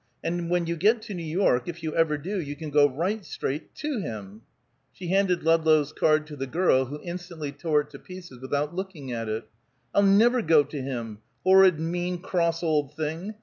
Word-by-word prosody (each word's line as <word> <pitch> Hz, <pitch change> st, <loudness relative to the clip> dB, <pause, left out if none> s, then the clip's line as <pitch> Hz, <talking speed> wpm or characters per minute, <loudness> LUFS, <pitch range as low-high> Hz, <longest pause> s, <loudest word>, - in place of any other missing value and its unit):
And 170 Hz, 0 st, -2 dB
when 175 Hz, -1 st, +1 dB
you 170 Hz, +1 st, -2 dB
get 215 Hz, +6 st, +3 dB
to 205 Hz, -, -7 dB
New 175 Hz, -, -5 dB
York, 160 Hz, -6 st, +1 dB
if 170 Hz, -1 st, -6 dB
you 155 Hz, -1 st, -3 dB
ever 165 Hz, -2 st, +2 dB
do, 185 Hz, +6 st, -3 dB
you 145 Hz, -2 st, -6 dB
can 155 Hz, 0 st, -7 dB
go 145 Hz, 0 st, +5 dB
right 185 Hz, +10 st, -2 dB
straight 150 Hz, -3 st, -5 dB
to 295 Hz, -5 st, -3 dB
him." 110 Hz, -, -7 dB, 0.5 s
She 180 Hz, -2 st, -8 dB
handed 190 Hz, -1 st, +2 dB
Ludlow's 160 Hz, -2 st, +3 dB
card 155 Hz, 0 st, +2 dB
to 150 Hz, -1 st, -9 dB
the 135 Hz, -1 st, -4 dB
girl, 130 Hz, -3 st, +2 dB
who 145 Hz, +4 st, -7 dB
instantly 175 Hz, -4 st, -6 dB
tore 150 Hz, +1 st, +1 dB
it 150 Hz, 0 st, -13 dB
to 140 Hz, -, -10 dB
pieces 175 Hz, -9 st, -11 dB
without 145 Hz, +4 st, -2 dB
looking 175 Hz, -8 st, -6 dB
at 115 Hz, -2 st, -3 dB
it. 110 Hz, 0 st, -3 dB, 0.5 s
"I'll -, -, +4 dB
never 220 Hz, +5 st, +5 dB
go 160 Hz, -5 st, +5 dB
to 145 Hz, 0 st, -6 dB
him 120 Hz, -5 st, -5 dB, 0.2 s
horrid, 190 Hz, -3 st, +6 dB
mean, 175 Hz, +2 st, -2 dB
cross 170 Hz, -1 st, -1 dB
old 150 Hz, -3 st, 0 dB
thing! 160 Hz, +7 st, -4 dB
160 Hz, 200 wpm, -26 LUFS, 145-180 Hz, 0.5 s, horrid